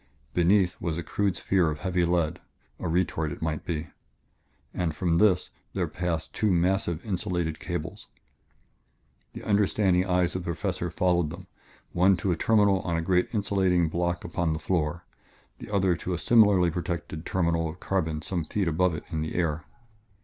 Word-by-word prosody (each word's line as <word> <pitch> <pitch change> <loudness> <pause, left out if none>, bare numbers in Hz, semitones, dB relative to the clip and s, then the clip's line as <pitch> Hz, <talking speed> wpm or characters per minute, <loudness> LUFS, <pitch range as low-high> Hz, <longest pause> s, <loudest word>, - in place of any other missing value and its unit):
Beneath 90 +1 +3
was 85 -2 -2
a 85 - -3
crude 100 +3 -1
sphere 90 -4 +2
of 75 0 -5
heavy 90 -2 +1
lead 85 -3 0 0.4
a - - -3
retort, 80 -2 0
it - - -7
might 80 -2 -2
be 80 -2 -3 0.8
and 85 -4 -2
from 85 +1 +1
this 100 -4 +3 0.2
there - - -1
passed 85 -3 -3
two 105 -2 +1
massive, 90 -1 +1
insulated 90 -5 -2
cables. - - -5 1.3
The - - -8
understanding 100 -3 +2
eyes 90 -1 +1
of 95 - -1
the - - -10
Professor 90 +1 -2
followed 85 -2 +1
them, - - -9 0.5
one 95 +2 +4
to 90 +2 -1
a - - +2
terminal 100 +1 +3
on 85 -3 -2
a - - 0
great 90 +1 +2
insulating 95 -5 +1
block 85 +1 -1
upon 85 -1 -1
the 80 - -3
floor, 85 -1 -1 0.5
the - - -9
other 95 -3 +2
to 90 - -3
a - - -3
similarly 100 -4 +4
protected 85 -2 -4
terminal 85 -3 0
of 85 +4 -9
carbon 80 -5 -1
some 90 -2 -2
feet 95 +4 -1
above 85 +1 +2
it - - -6
in 80 -2 -2
the 80 - -4
air. 80 -3 -1
90 Hz, 170 wpm, -27 LUFS, 80-95 Hz, 1.3 s, one